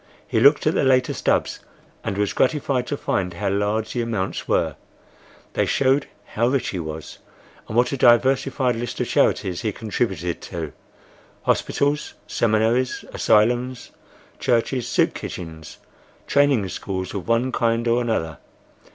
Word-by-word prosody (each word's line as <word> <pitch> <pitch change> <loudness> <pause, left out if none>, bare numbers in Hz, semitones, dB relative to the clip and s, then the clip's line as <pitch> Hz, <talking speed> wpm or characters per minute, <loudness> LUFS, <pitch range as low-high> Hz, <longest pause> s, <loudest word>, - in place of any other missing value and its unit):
He - - +1
looked 145 +2 +5
at 155 - +3
the - - +1
later 130 -1 +3
stubs - - 0 0.4
and 95 - -3
was 105 -1 0
gratified 130 -3 +1
to 145 - -2
find 90 -8 -2
how 100 +2 -1
large 105 +2 -1
the 120 - -1
amounts 110 -5 -3
were,—they - - -4
showed 135 +1 +2 0.3
how 115 +2 +2
rich 130 0 0
he 95 - -3
was,—and 80 +7 -9
what 120 0 +3
a 140 - -2
diversified 130 +1 +3
list 120 +1 -4
of - - +1
charities 90 -2 +1
he 110 -3 -1
contributed 95 -6 -2
to: 80 -5 -6 0.7
hospitals, 145 +1 0
seminaries, 115 +3 +1
asylums, 125 +4 +2 0.5
churches, 120 +1 0
soup 125 - +2
kitchens, 80 -2 -8 0.5
training 140 -8 +3
schools 95 -1 -4
of 100 -4 -5
one 115 +3 +2
kind 115 -1 +1
or 120 +1 +3
another. 80 -10 -2
115 Hz, 135 wpm, -22 LUFS, 100-130 Hz, 0.7 s, looked